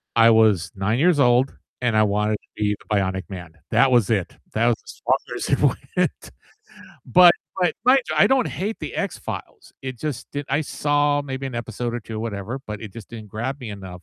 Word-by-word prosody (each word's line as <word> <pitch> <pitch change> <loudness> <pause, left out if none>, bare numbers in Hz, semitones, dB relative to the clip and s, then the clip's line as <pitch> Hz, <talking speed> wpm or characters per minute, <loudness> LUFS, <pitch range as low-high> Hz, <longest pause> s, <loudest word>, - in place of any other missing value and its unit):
I 115 0 +7
was 110 -6 +4
9 100 +5 0
years 170 0 +4
old 125 0 +3 0.2
and 115 -3 +1
I 110 - +6
wanted 105 +1 +1
to - - -12
be 105 -1 0
the 105 - -3
Bionic 95 -1 0
Man. 90 -4 -8 0.2
That 135 -1 +4
was 120 -3 +4
it, 100 -6 -1 0.2
that 115 +2 +2
was 120 - +4
as - - -12
far - - 0
as - - -4
it - - +2 0.4
went. - - -1 0.7
But 175 +7 +7 0.3
but 180 -2 +2
mind 265 +2 +6
you, - - -1
I - - +7
don't 265 -3 +3
hate 210 +4 -3
The - - -6
X-Files, 425 - -5
it 130 -3 -6
just 145 -4 -5
didn't 145 -1 -5
I 140 +3 +2
saw 145 -1 +1
maybe 135 -1 -5
an 130 - -6
episode 120 +1 -4
or 120 - -3
2, 110 0 -6
whatever, 115 +3 -4
but 105 -1 -6
it 105 -4 -8
just 115 - -10
didn't 110 -3 -9
grab 120 +7 -4
me 120 -4 -6
enough 95 -3 -9
115 Hz, 215 wpm, -23 LUFS, 105-135 Hz, 0.7 s, I